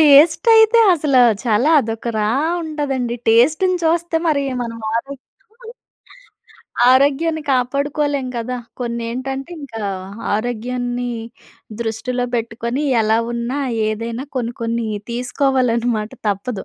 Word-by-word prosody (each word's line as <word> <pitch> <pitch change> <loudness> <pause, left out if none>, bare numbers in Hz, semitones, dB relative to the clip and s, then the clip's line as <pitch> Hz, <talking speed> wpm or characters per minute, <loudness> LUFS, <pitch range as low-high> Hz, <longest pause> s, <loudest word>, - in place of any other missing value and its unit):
టేస్టైతే 385 - +6
అసలు 285 -5 +2 0.2
చాలా 235 +6 +2
అదొక 225 0 -4
రా 210 0 +1 0.3
ఉంటదండి. 275 -6 -2
టేస్ట్‌ని 310 +11 +4
చూస్తే 335 +1 +1
మరి 290 -3 +2 0.2
మనం 230 -1 -6 0.2
ఆరోగ్యం 270 +3 -3 1.7
ఆరోగ్యాన్ని 290 +5 +2
కాపాడుకోలేం 280 +2 0
కదా! 250 +2 -3 0.2
కొన్నేంటంటే 250 +5 -4
ఇంకా 225 -5 -7 0.5
ఆరోగ్యాన్ని 245 +2 -2 0.7
దృష్టిలో 245 +2 -2
పెట్టుకొని 235 +3 -2 0.2
ఎలా 220 +1 +2
ఉన్నా 240 +3 -3 0.3
ఏదైనా 230 +4 -4
కొన్ని 240 -1 -2
కొన్ని 230 0 -1 0.2
తీసుకోవాలన్నమాట 245 -3 0 0.2
తప్పదు. 200 +1 -3
250 Hz, 95 wpm, -19 LUFS, 230-285 Hz, 1.7 s, టేస్టైతే